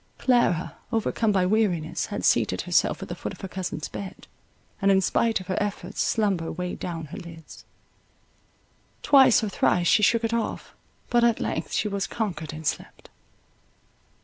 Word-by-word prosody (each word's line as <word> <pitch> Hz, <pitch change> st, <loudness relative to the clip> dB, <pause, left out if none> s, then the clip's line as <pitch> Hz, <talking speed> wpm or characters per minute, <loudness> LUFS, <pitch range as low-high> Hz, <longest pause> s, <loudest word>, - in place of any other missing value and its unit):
Clara, 240 Hz, -9 st, +1 dB
overcome 225 Hz, -1 st, +1 dB
by 190 Hz, -2 st, +2 dB
weariness, 185 Hz, -6 st, 0 dB
had -, -, -4 dB
seated -, -, +2 dB
herself -, -, +1 dB
at -, -, -7 dB
the -, -, -5 dB
foot -, -, -6 dB
of -, -, -13 dB
her 195 Hz, -, -5 dB
cousin's 180 Hz, -5 st, -4 dB
bed, 195 Hz, -2 st, -8 dB, 0.6 s
and 195 Hz, -, +3 dB
in 195 Hz, -1 st, +5 dB
spite 225 Hz, +4 st, +1 dB
of 185 Hz, -, -9 dB
her 185 Hz, 0 st, -3 dB
efforts 205 Hz, -2 st, -3 dB
slumber 195 Hz, -7 st, 0 dB
weighed 180 Hz, -1 st, -5 dB
down 165 Hz, -3 st, -5 dB
her 155 Hz, -, -8 dB
lids; 165 Hz, -3 st, -12 dB, 1.4 s
twice 265 Hz, -5 st, +6 dB
or 215 Hz, -, -1 dB
thrice 180 Hz, -2 st, +1 dB
she 210 Hz, -, +4 dB
shook 230 Hz, +2 st, +3 dB
it 225 Hz, 0 st, -1 dB
off; 230 Hz, -2 st, -3 dB, 0.4 s
but 240 Hz, -1 st, +4 dB
at 235 Hz, -1 st, +3 dB
length -, -, -3 dB
she -, -, +1 dB
was 200 Hz, -1 st, -2 dB
conquered 180 Hz, -9 st, -4 dB
and 155 Hz, 0 st, -9 dB
slept. -, -, -4 dB
195 Hz, 170 wpm, -25 LUFS, 175-225 Hz, 1.4 s, twice